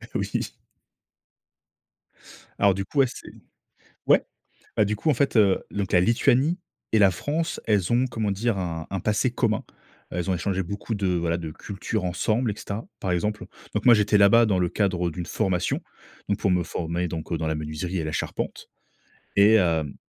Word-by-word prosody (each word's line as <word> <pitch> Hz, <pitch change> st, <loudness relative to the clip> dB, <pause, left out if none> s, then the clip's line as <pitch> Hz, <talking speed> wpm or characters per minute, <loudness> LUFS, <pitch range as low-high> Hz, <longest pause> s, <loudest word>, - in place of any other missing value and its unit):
Oui. -, -, -2 dB, 2.1 s
Alors, 100 Hz, -1 st, +5 dB
du 95 Hz, +1 st, -3 dB
coup, 145 Hz, -, -2 dB
ouais, 135 Hz, -, +6 dB
c'est -, -, -10 dB, 0.8 s
ouais, -, -, +5 dB, 0.6 s
heu, 105 Hz, -, +6 dB
du 105 Hz, +1 st, -1 dB
coup, 155 Hz, -, +1 dB
en -, -, +3 dB
fait, 135 Hz, 0 st, +1 dB
heu, 100 Hz, -3 st, +4 dB
donc 100 Hz, -2 st, -3 dB
la 90 Hz, -, +6 dB
Lituanie 125 Hz, -, +3 dB, 0.3 s
et 110 Hz, -, +4 dB
la 100 Hz, -2 st, +6 dB
France, 160 Hz, -, -2 dB
elles 105 Hz, -2 st, +2 dB
ont 125 Hz, +2 st, +3 dB
comment 115 Hz, -4 st, -2 dB
dire? 105 Hz, +2 st, 0 dB
Un 80 Hz, -3 st, -4 dB
un 95 Hz, 0 st, -2 dB
passé 105 Hz, +6 st, +1 dB
commun. 115 Hz, -3 st, 0 dB, 0.5 s
Elles 90 Hz, +1 st, -2 dB
ont -, -, +2 dB
échangé 95 Hz, +2 st, -1 dB
beaucoup 100 Hz, +5 st, -4 dB
de, 100 Hz, -2 st, -1 dB
voilà, 85 Hz, -2 st, 0 dB
de 80 Hz, -2 st, -5 dB
culture 100 Hz, +4 st, -4 dB
ensemble 110 Hz, +6 st, 0 dB
et -, -, -7 dB
cetera, 105 Hz, +1 st, -6 dB
par 95 Hz, -, -2 dB
exemple 105 Hz, +4 st, -1 dB, 0.3 s
donc -, -, -1 dB
moi, 125 Hz, -, +9 dB
j'étais 105 Hz, -1 st, +3 dB
là-bas 100 Hz, +4 st, +6 dB
dans 95 Hz, -4 st, +1 dB
le 90 Hz, -, +2 dB
cadre 90 Hz, -3 st, 0 dB
d'une 85 Hz, +1 st, -6 dB
formation, 90 Hz, -2 st, 0 dB, 0.5 s
donc 100 Hz, -, 0 dB
pour 95 Hz, -, +1 dB
me 90 Hz, -1 st, +2 dB
former 85 Hz, +1 st, -3 dB
donc 80 Hz, +1 st, -4 dB
dans 80 Hz, 0 st, -2 dB
la 80 Hz, -, -1 dB
menuiserie 75 Hz, +4 st, -4 dB
et 80 Hz, -, -2 dB
la 80 Hz, -, -3 dB
charpente -, -, -4 dB, 0.7 s
et 100 Hz, +2 st, +7 dB
hem 80 Hz, -7 st, +1 dB
100 Hz, 185 wpm, -25 LUFS, 90-110 Hz, 2.1 s, moi